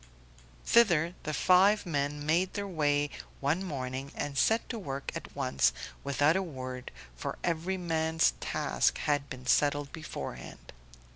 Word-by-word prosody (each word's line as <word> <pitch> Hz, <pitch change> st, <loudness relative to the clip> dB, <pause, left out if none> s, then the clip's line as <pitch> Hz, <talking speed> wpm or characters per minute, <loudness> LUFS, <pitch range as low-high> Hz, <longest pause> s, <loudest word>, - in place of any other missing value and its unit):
Thither 175 Hz, -8 st, +4 dB
the 155 Hz, -, -3 dB
five 185 Hz, +7 st, +4 dB
men 145 Hz, -2 st, -2 dB
made 175 Hz, +4 st, +1 dB
their 200 Hz, -1 st, -2 dB
way 145 Hz, -4 st, +1 dB, 0.3 s
one 150 Hz, +7 st, 0 dB
morning 135 Hz, -4 st, -4 dB
and 145 Hz, -1 st, -3 dB
set 225 Hz, +10 st, +2 dB
to 230 Hz, -, -3 dB
work 140 Hz, -7 st, -5 dB
at -, -, -7 dB
once, 65 Hz, -2 st, +2 dB, 0.3 s
without 145 Hz, +3 st, +3 dB
a 190 Hz, -, +2 dB
word, 130 Hz, -7 st, -6 dB, 0.3 s
for -, -, -5 dB
every 175 Hz, +3 st, -1 dB
man's 160 Hz, -2 st, +2 dB
task -, -, 0 dB
had 145 Hz, -1 st, 0 dB
been 130 Hz, -1 st, -8 dB
settled 145 Hz, +2 st, +2 dB
beforehand. 155 Hz, -1 st, -7 dB
150 Hz, 140 wpm, -30 LUFS, 140-180 Hz, 0.3 s, Thither